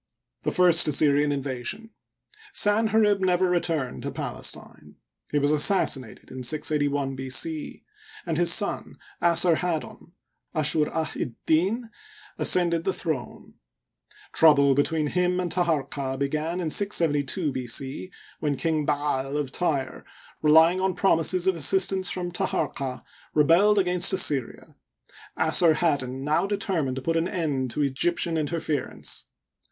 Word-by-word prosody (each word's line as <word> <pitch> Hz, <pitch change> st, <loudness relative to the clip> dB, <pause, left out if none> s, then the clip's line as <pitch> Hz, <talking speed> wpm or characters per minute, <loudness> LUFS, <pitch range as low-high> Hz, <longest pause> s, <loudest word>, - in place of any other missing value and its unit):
The -, -, -1 dB
First 175 Hz, -2 st, +5 dB
Assyrian 145 Hz, 0 st, +2 dB
Invasion. 140 Hz, -, -5 dB, 0.3 s
— 425 Hz, -1 st, -24 dB
Sanherib 210 Hz, -1 st, +2 dB
never 185 Hz, -1 st, +1 dB
returned 165 Hz, -7 st, -2 dB
to -, -, -4 dB
Palestine. -, -, -6 dB, 0.3 s
He 150 Hz, -, -1 dB
was 145 Hz, 0 st, +1 dB
assassinated 145 Hz, -, +1 dB
in 130 Hz, 0 st, -7 dB
68 150 Hz, +2 st, 0 dB
1 140 Hz, -1 st, -3 dB
B. 130 Hz, 0 st, -7 dB
c, 310 Hz, -, -2 dB, 0.4 s
and 165 Hz, -3 st, -2 dB
his 170 Hz, +1 st, +3 dB
son, 200 Hz, +3 st, +1 dB, 0.2 s
Assarhaddon 170 Hz, 0 st, 0 dB, 0.4 s
(Ashur 155 Hz, 0 st, +2 dB
ah'tddin), 165 Hz, -, -2 dB, 0.5 s
ascended 170 Hz, -2 st, +4 dB
the 190 Hz, -, -1 dB
throne. 150 Hz, -7 st, -5 dB, 0.8 s
Trouble 140 Hz, -3 st, +5 dB
between 150 Hz, +3 st, 0 dB
him 180 Hz, +3 st, 0 dB
and 180 Hz, -2 st, -3 dB
Taharqa 140 Hz, -6 st, -2 dB
began 155 Hz, +5 st, -2 dB
in 165 Hz, -3 st, -3 dB
672 160 Hz, -5 st, 0 dB
B. 130 Hz, -2 st, -5 dB
c, 135 Hz, +8 st, -3 dB, 0.3 s
when 145 Hz, -2 st, -2 dB
King 155 Hz, -2 st, -1 dB
Ba'al^ 145 Hz, -1 st, -1 dB
of 145 Hz, -3 st, -3 dB
Tyre, 145 Hz, -6 st, -2 dB, 0.4 s
relying 160 Hz, +4 st, +4 dB
on 190 Hz, -1 st, -1 dB
promises 180 Hz, -1 st, +1 dB
of 190 Hz, -, +3 dB
assistance 190 Hz, +4 st, +2 dB
from 175 Hz, -1 st, -3 dB
Taharqa, 140 Hz, -8 st, -3 dB, 0.3 s
rebelled 170 Hz, +8 st, +4 dB
against 180 Hz, -1 st, +4 dB
Assyria. 140 Hz, -9 st, -1 dB, 0.6 s
Assarhaddon 155 Hz, -5 st, +2 dB
now 150 Hz, +6 st, 0 dB
determined 185 Hz, -, -2 dB
to 135 Hz, -, -6 dB
put 165 Hz, +3 st, -1 dB
an 165 Hz, +1 st, 0 dB
end 150 Hz, -9 st, -2 dB
to 150 Hz, +5 st, -2 dB
Egyptian 165 Hz, +5 st, -1 dB
interference. 155 Hz, -2 st, -4 dB
160 Hz, 125 wpm, -25 LUFS, 140-180 Hz, 0.8 s, First